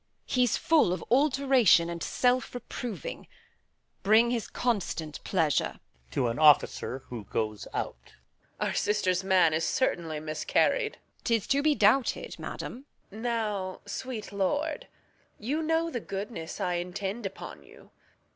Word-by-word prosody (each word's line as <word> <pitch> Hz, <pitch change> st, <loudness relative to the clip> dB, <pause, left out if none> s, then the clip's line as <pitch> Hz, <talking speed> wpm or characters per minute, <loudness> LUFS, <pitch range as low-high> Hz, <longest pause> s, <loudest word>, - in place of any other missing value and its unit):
He's 250 Hz, -3 st, +2 dB
full 320 Hz, -, +3 dB
of 180 Hz, -, -5 dB
alteration 265 Hz, -, +4 dB
And 170 Hz, 0 st, -5 dB
self 250 Hz, +5 st, +1 dB
reproving. 245 Hz, -, -6 dB, 0.7 s
Bring 220 Hz, +4 st, +5 dB
his 235 Hz, -3 st, -1 dB
constant 190 Hz, -10 st, -2 dB
pleasure. 160 Hz, -6 st, +1 dB, 0.3 s
[Exit 130 Hz, -, -1 dB
an 115 Hz, +2 st, -1 dB
Officer.] 145 Hz, -3 st, +4 dB
Reg. 110 Hz, -1 st, -3 dB, 0.7 s
Our -, -, 0 dB
sister's 190 Hz, -3 st, +1 dB
man 185 Hz, -4 st, +4 dB
is 160 Hz, +1 st, 0 dB
certainly 165 Hz, -9 st, 0 dB
miscarried. 155 Hz, -, +1 dB
Edm. -, -, -25 dB
Tis 230 Hz, -3 st, +1 dB
to 280 Hz, +1 st, +2 dB
be 300 Hz, 0 st, +3 dB
doubted, 230 Hz, +4 st, +2 dB
madam. 260 Hz, +4 st, -6 dB, 0.3 s
Reg. 215 Hz, +3 st, -9 dB
Now, 210 Hz, -6 st, -2 dB
sweet 215 Hz, +1 st, -5 dB
lord, 290 Hz, -, -1 dB, 0.5 s
You 275 Hz, +9 st, -2 dB
know 325 Hz, +1 st, +1 dB
the 245 Hz, -, -2 dB
goodness 200 Hz, -5 st, -6 dB
I 180 Hz, -1 st, 0 dB
intend 195 Hz, +4 st, -4 dB
upon 195 Hz, -, -9 dB
you. -, -, -18 dB
210 Hz, 125 wpm, -29 LUFS, 175-255 Hz, 0.7 s, Bring